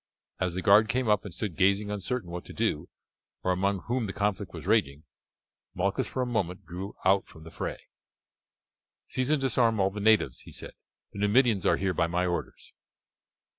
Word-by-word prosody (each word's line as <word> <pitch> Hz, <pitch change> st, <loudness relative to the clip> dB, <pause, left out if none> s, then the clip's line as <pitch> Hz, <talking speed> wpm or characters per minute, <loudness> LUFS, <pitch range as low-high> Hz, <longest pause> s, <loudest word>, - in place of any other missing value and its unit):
As 90 Hz, -2 st, -1 dB
the 90 Hz, -, -3 dB
guard 105 Hz, +2 st, +6 dB
came 125 Hz, 0 st, 0 dB
up 105 Hz, -2 st, +2 dB
and 100 Hz, -, -6 dB
stood 95 Hz, 0 st, -4 dB
gazing 100 Hz, +3 st, +2 dB
uncertain 105 Hz, -1 st, -3 dB
what 90 Hz, 0 st, -5 dB
to -, -, -10 dB
do, 75 Hz, -, -1 dB, 0.5 s
or 95 Hz, -, +1 dB
among 95 Hz, +1 st, 0 dB
whom 120 Hz, -2 st, -2 dB
the 95 Hz, -, -5 dB
conflict 100 Hz, -2 st, -1 dB
was -, -, -9 dB
raging, 70 Hz, +2 st, +1 dB, 0.7 s
Malchus 100 Hz, +2 st, 0 dB
for 130 Hz, -, -2 dB
a -, -, -1 dB
moment 100 Hz, -6 st, -2 dB
drew 90 Hz, +4 st, -7 dB
out 95 Hz, +1 st, +3 dB
from 80 Hz, -, -14 dB
the 80 Hz, -, -11 dB
fray. -, -, -4 dB, 1.3 s
"Seize 130 Hz, +1 st, -1 dB
and 155 Hz, -1 st, +3 dB
disarm 120 Hz, -4 st, +3 dB
all 95 Hz, 0 st, +2 dB
the 105 Hz, -, -6 dB
natives," 110 Hz, +1 st, +3 dB
he -, -, -12 dB
said; -, -, -7 dB, 0.4 s
"the 100 Hz, -, -7 dB
Numidians 105 Hz, -1 st, +3 dB
are -, -, +4 dB
here 95 Hz, -1 st, 0 dB
by 85 Hz, 0 st, +1 dB
my 90 Hz, +2 st, 0 dB
orders." 90 Hz, -1 st, -4 dB
100 Hz, 190 wpm, -28 LUFS, 90-110 Hz, 1.3 s, guard